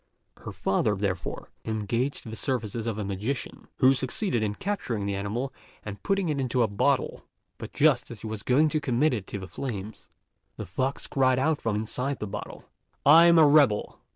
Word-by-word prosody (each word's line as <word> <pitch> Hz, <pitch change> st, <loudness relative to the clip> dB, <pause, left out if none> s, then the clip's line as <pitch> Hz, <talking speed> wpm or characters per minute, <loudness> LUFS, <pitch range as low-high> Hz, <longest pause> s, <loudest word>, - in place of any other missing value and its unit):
Her -, -, -8 dB
father, 105 Hz, +2 st, 0 dB
therefore, 95 Hz, -3 st, -3 dB
engaged 115 Hz, +5 st, -2 dB
the 110 Hz, -, -6 dB
services 115 Hz, -3 st, -2 dB
of 110 Hz, -2 st, -2 dB
a 105 Hz, -, -3 dB
magician, 105 Hz, +7 st, -4 dB
who 130 Hz, +1 st, +6 dB
succeeded 130 Hz, -, -1 dB
in 105 Hz, -1 st, -1 dB
capturing 125 Hz, -, -3 dB
the 100 Hz, -, -1 dB
animal 110 Hz, +7 st, -3 dB, 0.3 s
and 100 Hz, -1 st, -7 dB
putting 195 Hz, -2 st, 0 dB
it 150 Hz, -3 st, -1 dB
into 125 Hz, -1 st, +1 dB
a -, -, +2 dB
bottle; 100 Hz, 0 st, 0 dB, 0.4 s
but -, -, -7 dB
just 140 Hz, -5 st, +3 dB
as 115 Hz, -3 st, -9 dB
he -, -, -8 dB
was 110 Hz, -1 st, -5 dB
going 140 Hz, +5 st, +3 dB
to 155 Hz, 0 st, -1 dB
commit 145 Hz, +1 st, +2 dB
it 105 Hz, -5 st, -4 dB
to -, -, -5 dB
the 95 Hz, -1 st, -7 dB
flames, 105 Hz, +1 st, -6 dB, 0.5 s
the -, -, -5 dB
fox 130 Hz, +2 st, -2 dB
cried 130 Hz, -2 st, +2 dB
out 150 Hz, +3 st, +1 dB
from 115 Hz, -2 st, -1 dB
inside 125 Hz, +6 st, -2 dB
the -, -, -4 dB
bottle, 100 Hz, -, -7 dB, 0.4 s
"I'm 165 Hz, +4 st, +8 dB
a 160 Hz, -, +8 dB
rebel!" 145 Hz, -8 st, +3 dB
120 Hz, 185 wpm, -27 LUFS, 105-140 Hz, 0.5 s, I'm